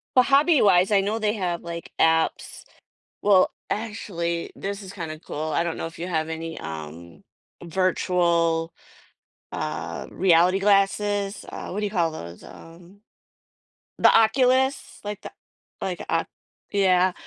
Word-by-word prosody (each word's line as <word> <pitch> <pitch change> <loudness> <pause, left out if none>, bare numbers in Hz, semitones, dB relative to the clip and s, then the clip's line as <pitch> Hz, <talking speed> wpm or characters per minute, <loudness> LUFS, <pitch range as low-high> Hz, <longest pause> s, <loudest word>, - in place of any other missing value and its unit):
But 255 -1 +6
hobby-wise, 275 - +4
I 205 -2 +4
know 205 +3 -1
they 215 0 0
have, 180 -4 -2
like, 170 0 -7
apps 160 0 +1 0.6
Well, 195 -3 +4 0.2
actually, 180 -6 -3
this 200 +1 -4
is 190 - -9
kinda 160 -5 -6
cool. 155 0 -5
I 170 - +2
don't 170 -1 -3
know - - -4
if 165 - -9
you 175 - -5
have 160 -2 -1
any, 160 0 -5
um, 80 +2 -9 0.4
virtual, 170 -2 +1 0.8
uh, 85 +1 -4
reality 180 0 +4
glasses? 200 0 +1
Uh, - - -7
what 195 - -4
do 210 - -1
you - - -4
call 170 -5 +1
those? 85 - -9
Um, 175 +5 -15 1.0
the - - +6
Oculus. 260 +4 +2
Like 205 -1 -5
the - - -8 0.5
like - - -3
Oc - - +1 0.5
yeah. 185 -2 +3
180 Hz, 140 wpm, -24 LUFS, 165-205 Hz, 1.0 s, But